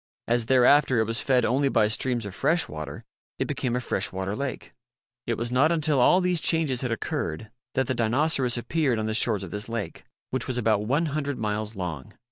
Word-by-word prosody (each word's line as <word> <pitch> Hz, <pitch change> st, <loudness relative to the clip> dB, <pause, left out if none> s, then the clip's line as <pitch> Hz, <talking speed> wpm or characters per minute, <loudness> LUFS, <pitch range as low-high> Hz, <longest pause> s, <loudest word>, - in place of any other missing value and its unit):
As 120 Hz, -1 st, +1 dB
thereafter 130 Hz, +1 st, +4 dB
it 110 Hz, -, +3 dB
was 115 Hz, +2 st, -2 dB
fed 125 Hz, -3 st, +2 dB
only 135 Hz, +4 st, +2 dB
by 105 Hz, -, +3 dB
streams 120 Hz, +1 st, 0 dB
of 100 Hz, -, -7 dB
fresh 155 Hz, -, +1 dB
water, 75 Hz, -2 st, -7 dB, 0.3 s
it -, -, -1 dB
became 125 Hz, -1 st, -2 dB
a -, -, 0 dB
fresh 105 Hz, -5 st, -2 dB
water 95 Hz, +2 st, -3 dB
lake. 140 Hz, +1 st, -5 dB, 0.5 s
It 115 Hz, -, 0 dB
was 120 Hz, +1 st, -2 dB
not 140 Hz, +6 st, +3 dB
until 155 Hz, -4 st, +2 dB
all 180 Hz, +9 st, +5 dB
these 180 Hz, -2 st, +1 dB
changes 155 Hz, -7 st, +1 dB
had 125 Hz, -3 st, -2 dB
occurred 105 Hz, -2 st, -3 dB, 0.2 s
that 135 Hz, -, +2 dB
the 130 Hz, -, -1 dB
Dinoceras 125 Hz, +2 st, +2 dB
appeared 135 Hz, 0 st, 0 dB
on 110 Hz, -, -2 dB
the 110 Hz, -, -2 dB
shores 110 Hz, -3 st, +1 dB
of 90 Hz, -, -8 dB
this 105 Hz, +3 st, -5 dB
lake, 115 Hz, -3 st, -5 dB, 0.3 s
which 130 Hz, -1 st, -1 dB
was 130 Hz, -, 0 dB
about 110 Hz, -3 st, +1 dB
one 145 Hz, +7 st, +1 dB
hundred 145 Hz, -3 st, -3 dB
miles 105 Hz, -1 st, -3 dB
long. 85 Hz, -8 st, -6 dB
120 Hz, 210 wpm, -26 LUFS, 110-140 Hz, 0.5 s, all